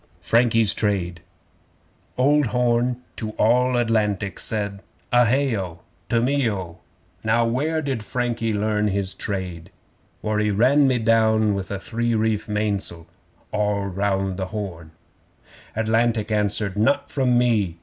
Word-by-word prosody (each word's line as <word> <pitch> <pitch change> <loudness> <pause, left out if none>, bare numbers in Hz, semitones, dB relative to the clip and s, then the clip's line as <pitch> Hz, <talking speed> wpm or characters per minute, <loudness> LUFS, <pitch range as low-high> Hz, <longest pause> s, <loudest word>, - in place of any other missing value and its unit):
Frankie's 115 +2 +3
Trade 90 -5 -1 1.0
Old 145 +2 +3
Horn 125 +1 +1
to 110 -2 -4
All 125 +3 +3
Atlantic 105 -4 0
said: 100 -2 -3 0.3
(A 120 -1 +5
hay 135 0 +2
O! 90 -5 -5 0.3
To 115 - +2
me 130 0 +1
O!) 90 -4 -5 0.4
'Now 115 +2 +2
where 150 +7 0
did 135 -5 -2
Frankie 115 0 -2
learn 105 0 0
his 100 -1 -1
trade? 90 -4 -5 0.5
For 105 0 0
he 105 0 +1
ran 130 +8 +4
me 130 -2 +2
down 110 -2 +3
with 100 -1 -4
a 100 - -3
three 120 +3 -1
reef 110 -1 0
mains'le.' 100 -5 -2 0.5
(All 105 -1 0
round 95 -1 -1
the 95 -1 -3
Horn!) 90 -6 -6 0.9
Atlantic 110 0 +1
answered: 105 -1 0
'Not 110 +7 +1
from 130 -3 +2
me! 110 -8 +1
110 Hz, 135 wpm, -23 LUFS, 100-120 Hz, 1.0 s, A